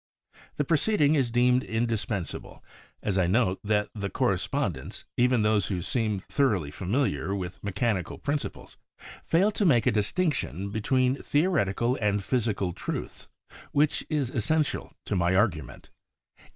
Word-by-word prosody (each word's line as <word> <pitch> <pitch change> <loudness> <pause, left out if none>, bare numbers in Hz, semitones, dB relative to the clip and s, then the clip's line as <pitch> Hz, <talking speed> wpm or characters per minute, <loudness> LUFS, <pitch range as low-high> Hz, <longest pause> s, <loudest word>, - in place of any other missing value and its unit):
The 150 - +2
preceding 155 0 +2
is 135 -6 +2
deemed 125 +2 +3
indispensable 110 -4 -3 0.4
as 100 -2 +1
I 90 - +3
note 95 -1 +2
that 105 0 +1
the 100 -2 -3
correspondents, - - -1
even 125 -2 +3
those 105 -4 +2
who 90 -3 -2
seem 110 0 0
thoroly 100 - 0
familiar 95 - -1
with 90 -3 -6
mechanical 100 -2 -1
principles, 145 0 -4 0.5
fail 190 +6 +3
to 210 - -1
make 130 - +4
a - - +4
distinction 105 - -1
be 110 - -3
tween 130 +3 +1
theoretical 130 - +1
and 105 -1 +1
physical 105 -6 0
truths - - -5 0.5
which 145 +1 +2
is 145 -6 0
essential 150 +6 0
to - - -1
my 90 0 +2
argument. 90 - -1
110 Hz, 135 wpm, -27 LUFS, 100-135 Hz, 0.5 s, make